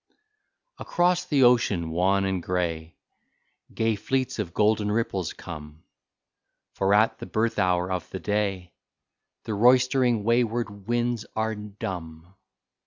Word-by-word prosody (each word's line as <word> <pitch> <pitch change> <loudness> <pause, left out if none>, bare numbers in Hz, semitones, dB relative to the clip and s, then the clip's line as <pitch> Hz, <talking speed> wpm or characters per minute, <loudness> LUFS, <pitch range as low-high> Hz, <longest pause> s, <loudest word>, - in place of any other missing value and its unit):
Across 175 0 +1
the 140 -4 +2
ocean, 105 -9 +3
wan 95 +3 +2
and 95 -2 -1
gray. 85 -3 -3 0.8
Gay 110 -1 0
fleets 130 +4 -2
of 95 -5 -3
golden 105 +1 +2
ripples 100 -6 -1
come, 75 -2 -10 0.9
For 100 +1 +2
at 110 +2 +3
the - - -7
birth 110 0 -1
hour 90 -1 +1
of 90 -2 -3
the 95 - -6
day 100 -4 -2 0.7
The 110 - -4
roistering, 125 0 +3
wayward 115 -3 0
winds 120 -1 -1
are 110 0 0
dumb. 90 -5 -7
105 Hz, 120 wpm, -26 LUFS, 90-115 Hz, 0.9 s, ocean